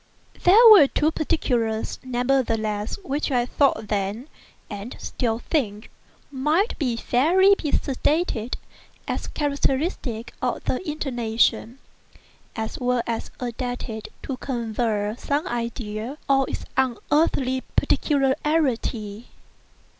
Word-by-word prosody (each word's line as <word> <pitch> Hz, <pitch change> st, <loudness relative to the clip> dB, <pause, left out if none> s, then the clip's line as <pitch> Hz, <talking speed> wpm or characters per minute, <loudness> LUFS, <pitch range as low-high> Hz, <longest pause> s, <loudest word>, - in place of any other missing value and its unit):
There 430 Hz, +7 st, +8 dB
were 350 Hz, -10 st, +9 dB
two 305 Hz, +3 st, +1 dB
particulars, 235 Hz, -9 st, -1 dB
nevertheless, 240 Hz, -5 st, 0 dB
which 290 Hz, -1 st, -2 dB
I 245 Hz, -3 st, +1 dB
thought 245 Hz, -5 st, +1 dB
then, 205 Hz, +7 st, -2 dB, 0.4 s
and 205 Hz, +4 st, -7 dB
still 225 Hz, -3 st, -2 dB
think, 230 Hz, -5 st, -2 dB, 0.4 s
might 305 Hz, -, +1 dB, 0.3 s
fairly 360 Hz, +10 st, +4 dB
be 310 Hz, -7 st, -2 dB
stated 270 Hz, -3 st, 0 dB, 0.5 s
as -, -, -3 dB
characteristic 280 Hz, -, -1 dB
of 250 Hz, -1 st, -1 dB
the 255 Hz, -, -1 dB
intonation—as 235 Hz, -3 st, -3 dB
well 250 Hz, -2 st, +1 dB, 0.4 s
adapted 245 Hz, -2 st, -4 dB, 0.2 s
to 265 Hz, -, -4 dB
convey 225 Hz, -5 st, -1 dB
some 290 Hz, +2 st, -1 dB
idea 235 Hz, +1 st, -4 dB
of 270 Hz, -1 st, +4 dB
its -, -, -5 dB
unearthly 260 Hz, +1 st, +1 dB
peculiarity. 265 Hz, -7 st, 0 dB
250 Hz, 95 wpm, -24 LUFS, 225-285 Hz, 0.5 s, were